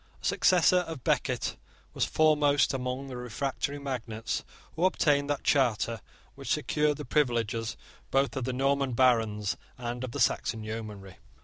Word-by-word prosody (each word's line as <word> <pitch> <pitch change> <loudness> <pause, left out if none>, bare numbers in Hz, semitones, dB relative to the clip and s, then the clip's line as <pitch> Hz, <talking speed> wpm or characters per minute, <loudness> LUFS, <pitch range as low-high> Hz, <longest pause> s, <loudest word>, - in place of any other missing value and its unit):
A - - -10
successor 180 0 +4
of 160 -7 -7
Becket - - 0 0.4
was - - +1
foremost 150 -2 +3
among 130 +1 -3
the 130 -2 -7
refractory 135 +4 -3
magnates 120 -5 -4 0.3
who 165 - -2
obtained 145 -6 +2
that 145 -1 -1
charter 115 -5 +1 0.3
which - - -6
secured 150 -1 +1
the 150 - -6
privileges 120 -4 0 0.3
both 135 +1 +1
of 130 -3 -2
the 130 - -1
Norman 135 0 +1
barons 115 -5 +2 0.2
and 120 0 -4
of 130 - -3
the - - -5
Saxon 110 -1 +1
yeomanry. 105 -3 -7
130 Hz, 145 wpm, -29 LUFS, 115-145 Hz, 0.4 s, successor